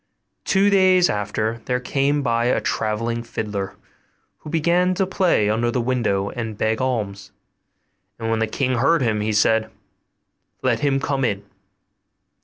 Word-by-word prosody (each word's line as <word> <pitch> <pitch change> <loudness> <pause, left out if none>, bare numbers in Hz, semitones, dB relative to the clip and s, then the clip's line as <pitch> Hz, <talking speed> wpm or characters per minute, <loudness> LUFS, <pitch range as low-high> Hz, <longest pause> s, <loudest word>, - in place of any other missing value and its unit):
Two 195 +1 +3
days 185 -2 +4
after 110 +2 -2
there 125 -1 0
came 140 +3 0
by 115 -2 +1
a 125 - +2
travelling 115 +2 -2
fiddler, 105 -4 -4 0.6
who - - -10
began 175 +3 +2
to 190 +1 +1
play 185 - +2
under 115 +3 +1
the 125 - -1
window 115 -5 0
and 115 -3 -5
beg 110 +2 0
alms; 105 -6 -3 0.9
and 115 - -4
when 115 - +1
the 110 - +1
king 130 +2 -1
heard 140 +3 +3
him, 110 -3 0
he 110 +1 -1
said, 110 +1 +2 0.9
'Let - - +1
him 140 -2 +1
come 135 0 -1
in. 100 -5 -1
120 Hz, 150 wpm, -22 LUFS, 110-140 Hz, 0.9 s, days